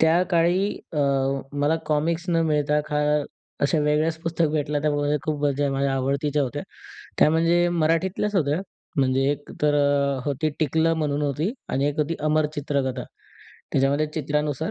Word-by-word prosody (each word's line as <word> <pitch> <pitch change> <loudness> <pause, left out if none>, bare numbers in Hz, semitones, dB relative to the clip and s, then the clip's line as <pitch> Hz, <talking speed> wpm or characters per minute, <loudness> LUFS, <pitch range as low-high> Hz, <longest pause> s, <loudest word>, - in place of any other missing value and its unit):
त्याकाळी 175 +2 +3 0.3
अ, 155 - -2 0.5
मला 145 +3 +1
कॉमिक्स 160 +3 0
न 165 -1 +2
मिळता, 150 -1 +1
खा 150 - 0 0.7
अशा 155 +3 +2
वेगळ्याच 150 +2 +1
पुस्तक 165 -1 +1
भेटल्या. 150 -1 0
त्यामध्ये 145 0 +1
खूप 150 -2 -2
माझ्या 145 0 +1
म्हणजे 135 0 0
आवडतीच्या 140 +2 0
होत्या. 125 - -3 0.6
त्या - - +6
म्हणजे 170 +2 +3
मराठीतल्याच 180 +6 0
होत्या, 150 0 +1 0.4
म्हणजे 135 -1 +2
एक 145 0 -9
तर 150 -1 +3 0.5
होती 145 +2 0
टिकलं 160 +2 +2
म्हणून 150 -2 -1
होती 150 - -1 0.2
आणि 135 +2 +1
एक 145 - -4
होती 155 +2 -1
अमर 155 0 +2
चित्रकथा. 140 -4 -2 0.7
त्याच्यामध्ये 140 +3 +2
चित्रानुसार 150 0 -1
150 Hz, 145 wpm, -24 LUFS, 145-160 Hz, 0.7 s, त्या